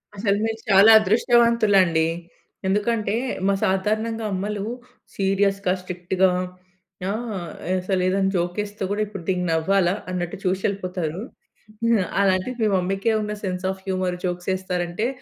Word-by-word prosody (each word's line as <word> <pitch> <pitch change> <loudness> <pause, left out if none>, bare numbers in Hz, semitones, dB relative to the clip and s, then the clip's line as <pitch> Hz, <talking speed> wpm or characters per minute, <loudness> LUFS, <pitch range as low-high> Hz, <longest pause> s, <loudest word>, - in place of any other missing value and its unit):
అసలు 200 0 +1
మీరు 225 0 -3
చాలా 200 +3 +8
అదృష్టవంతులండి. 215 -6 +3 0.6
ఎందుకంటే, 210 +1 0 0.3
మా 200 - +3
సాధారణంగా 215 +4 0
అమ్మలు 200 +2 -3 0.5
సీరియస్‌గా, 195 -1 +1
స్ట్రిక్ట్‌గా 180 +1 0 0.8
ఆహ్, 220 +1 -3 0.5
అసలు 185 0 -1
ఏదైనా 195 +1 +2
జోక్ 175 0 -1
ఏస్తే 205 -1 -6
కూడా 205 +1 0
ఇప్పుడు 195 -4 -8
దీనికి 180 -2 0
నవ్వాలా 175 +3 +2 0.2
అన్నట్టు 180 +1 -3
చూసి 185 +1 0
వెళ్ళిపోతారు. 185 -4 -2 0.7
హా, 225 -5 +3 0.2
అలాంటి 190 +4 +2
మీ 220 - +3
మమ్మీ‌కి 195 +4 0
ఉన్న 210 0 -3
సెన్స్ 185 -1 -3
ఆఫ్ 190 0 -9
హ్యూమర్ 185 -1 -1
జోక్స్ 180 0 -3
వేస్తారంటే, 185 +2 -2
195 Hz, 125 wpm, -23 LUFS, 180-210 Hz, 0.8 s, చాలా